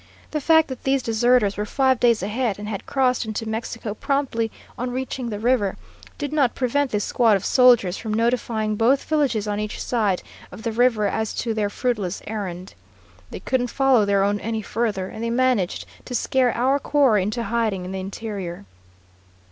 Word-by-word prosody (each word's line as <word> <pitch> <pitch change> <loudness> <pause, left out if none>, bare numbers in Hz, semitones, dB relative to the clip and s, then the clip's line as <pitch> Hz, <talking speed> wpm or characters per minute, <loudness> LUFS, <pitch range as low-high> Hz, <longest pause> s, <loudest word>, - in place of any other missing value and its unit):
The 300 - -2
fact 320 +2 +4
that 260 - -7
these 270 -1 +1
deserters 230 -2 +2
were 210 - -1
five 260 +1 +2
days 235 -5 +3
ahead 215 +1 -1
and 210 0 -7
had 205 -2 -5
crossed 255 -2 +1
into 220 0 -4
Mexico 220 -1 -4
promptly 245 -2 -1 0.3
on 250 +1 -3
reaching 255 -1 -4
the 210 - -4
river, 220 -3 +1 0.4
did 290 0 -4
not 275 -6 +2
prevent 270 +2 0
this 210 -3 -1
squad 225 -4 +3
of 190 - -8
soldiers 240 -8 +4
from 220 - -5
notifying 225 -1 0
both 255 +5 +3
villages 275 -9 0
on 205 0 -1
each 210 0 -4
side 210 -6 0 0.3
of 220 - -10
the 230 - -1
river 230 -2 +2
as 220 +2 -1
to 230 - -2
their 210 -2 0
fruitless 210 -5 -2
errand. 190 -4 -5 0.6
They - - -8
couldn't 245 -1 0
follow 265 -3 +3
their 200 -1 +2
own 205 +1 +1
any 220 0 -3
farther, 210 -4 -2
and 220 - -7
they 230 - -1
managed 240 -6 +1 0.2
to 250 - -5
scare 255 +1 +2
our 265 +4 +2
quarry 275 -8 +3
into 215 +5 -2
hiding 220 -6 -1
in 185 - -6
the 190 - -4
interior. 190 - -6
230 Hz, 185 wpm, -23 LUFS, 210-255 Hz, 0.6 s, fact